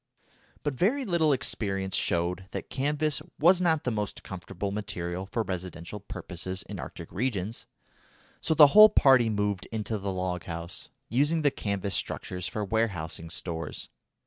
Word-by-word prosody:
But 145 - 0
very 240 - +1
little 170 -6 +3
experience 95 -7 0
showed 90 +1 0
that - - -5
canvas 150 +1 0 0.2
was 180 +4 +5
not 160 -4 +2
the 125 - 0
most 105 -2 -3
comfortable 95 +2 -5
material 95 -3 -4
for 115 +3 -1
residential 90 0 -5
purposes 95 -1 -5
in - - -7
Arctic - - -8
regions, 110 -1 -2 0.7
so 160 - +1
the 155 - +10
whole 215 0 +11
party 130 - +5
moved 105 -2 -1
into 110 -1 -2
the 100 0 -2
log 90 -1 -3
house, 85 +1 -6 0.2
using 145 +6 +2
the 145 - +4
canvas 100 -6 -3
structures 90 0 -3
for 105 +3 -3
warehousing 95 -7 -2
stores. 80 +1 -5
105 Hz, 145 wpm, -28 LUFS, 90-135 Hz, 0.7 s, whole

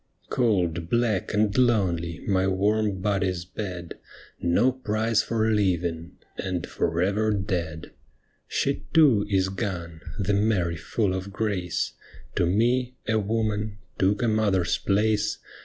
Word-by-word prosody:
Cold, 90 -9 +1
black, 115 -5 +1
and 105 -1 +1
lonely 90 -9 +1
my 95 -1 +2
warm 100 +1 +1
body's 95 -3 0
bed. 90 -3 -6 0.4
No 100 +10 +3
prize 115 -3 0
for 110 -1 0
living 85 -5 0
— - - -36
and 90 -3 -2
for 85 +2 0
ever 105 +3 +1
dead. 90 -6 -2 0.6
She 140 - -1
too 130 -11 +5
is 95 -2 +2
gone, 90 -5 -4 0.2
the 100 -1 0
Mary 100 -5 +1
full 95 +4 -1
of 95 +1 -4
grace. 95 -5 -1 0.4
To - - +1
me, 120 +6 +1
a 110 -1 +2
woman, 105 -1 -1 0.2
took 100 +5 +2
a - - +2
mother's 105 -5 +2
place. 105 +1 +1
100 Hz, 130 wpm, -26 LUFS, 90-110 Hz, 0.6 s, too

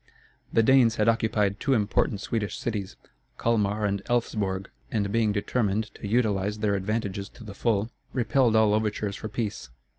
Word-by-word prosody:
The 115 - +4
Danes 120 -2 +5
had 105 - +1
occupied 110 -3 +2
two 135 -3 +2
important 105 -1 +1
Swedish 105 -2 -2
cities, 105 -5 -3 0.4
Calmar 105 -2 +1
and 100 -1 0
Elfsborg, 100 -5 -1 0.3
and 100 -3 0
being 110 -1 +2
determined 105 0 -1
to - - -7
utilize 105 -2 +1
their 105 -1 +1
advantages 100 0 -2
to - - -14
the 105 -2 -8
full, 110 +1 0 0.2
repelled 125 -1 +2
all 110 -1 +5
overtures 105 -1 -1
for 110 - -6
peace. 105 - -4
105 Hz, 155 wpm, -27 LUFS, 100-115 Hz, 0.4 s, Danes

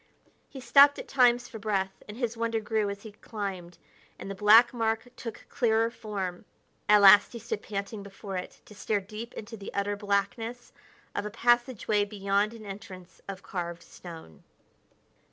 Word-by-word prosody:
He 275 - -9
stopped 280 +3 +6
at - - -7
times 245 -2 +3
for 225 - -9
breath, 195 -2 -2
and 210 +1 -9
his 240 -2 -2
wonder 230 0 -1
grew 215 -1 -1
as 200 0 -7
he 220 - -9
climbed 195 -5 -6 0.4
and 195 - -7
the - - -3
black 215 +5 +6
mark 225 0 -1
took 230 -2 -8
clearer 230 -2 +1
form. 195 -6 -5 0.5
At 210 0 +7
last 200 +3 +8
he - - -5
stood 225 -2 -4
panting 200 0 -5
before 195 0 -8
it, 180 - -6
to - - -14
stare 205 +1 -1
deep 215 +4 -9
into 220 +2 -7
the 200 - -8
utter 200 +1 0
blackness 205 +4 -2 0.4
of - - -2
a 210 - -4
passageway 240 -2 +2
beyond 200 +1 0
an 220 -2 -11
entrance 190 -2 -10
of 195 -1 -7
carved 175 -2 -5
stone. 165 - -12
210 Hz, 170 wpm, -28 LUFS, 195-230 Hz, 0.5 s, last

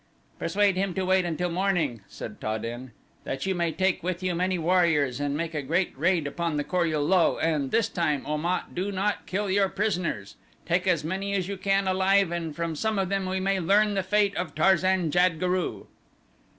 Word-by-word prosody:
"Persuade 195 +2 +2
him 190 -1 -1
to 190 -1 -1
wait 185 0 +3
until 175 +1 -2
morning," 170 - 0
said - - -9
Ta 110 0 -1
den, 120 +3 -6 0.3
"that 135 0 -4
you 190 - +1
may 170 -2 0
take 190 +2 0
with 180 +1 -3
you 185 -1 0
many 180 +2 0
warriors 165 -6 +2
and 145 0 -1
make 165 0 -3
a 150 - -2
great 165 +7 0
raid 170 +2 +1
upon 160 +2 -2
the 145 - 0
Kor 175 +2 0
ul 155 -2 0
lul, 185 0 +3
and 155 -4 0
this 230 - +2
time, 150 -5 -1
Om 150 +1 -2
at, 180 - -2
do 190 +3 -2
not 200 +2 -2
kill 200 +1 -1
your 195 0 +3
prisoners. 170 - -2 0.3
Take 175 +2 0
as 170 -5 +2
many 195 +5 -2
as 185 -2 -1
you 200 - -3
can 195 +1 +1
alive 190 0 +3
and 165 -3 -3
from 170 -1 -3
some 220 +7 -1
of 190 -2 0
them 195 -1 -1
we 190 +1 -1
may 195 0 0
learn 205 +4 +3
the 195 - +1
fate 200 +1 +1
of 175 -5 -3
Tarzan 185 0 +3
jad 175 0 +3
guru." 180 0 -1
180 Hz, 210 wpm, -26 LUFS, 160-190 Hz, 0.3 s, wait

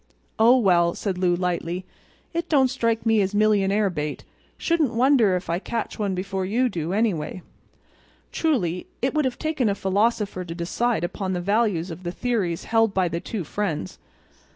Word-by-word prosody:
"Oh, 235 +3 +7
well," 175 -7 +3
said 190 -3 -3
Lou 180 -1 +2
lightly, 180 0 -2 0.5
"it 340 0 -2
don't 270 -4 +4
strike 230 -3 0
me 225 -2 +4
as 195 +1 -1
millionaire 205 -1 +3
bait. 150 -3 -4 0.3
Shouldn't 315 -8 +1
wonder 240 -6 +4
if 180 - -4
I 170 +1 0
catch 230 +3 -4
one 200 -3 0
before 190 +1 -3
you 240 +7 +1
do, 165 -4 -3
anyway." 185 -5 -1 0.9
Truly 180 - 0 0.2
it 265 - +1
would 305 -2 +1
have 255 -2 -1
taken 310 -8 0
a 200 - 0
philosopher 200 0 0
to 165 -1 -7
decide 185 +4 -1
upon 190 +2 -2
the 180 - -1
values 195 -2 0
of 165 +2 -8
the 175 -1 -4
theories 195 -6 -1
held 225 -2 +2
by 185 -2 +2
the 170 +1 -2
two 200 +1 -4
friends. 160 - -3
200 Hz, 175 wpm, -24 LUFS, 180-230 Hz, 0.9 s, Oh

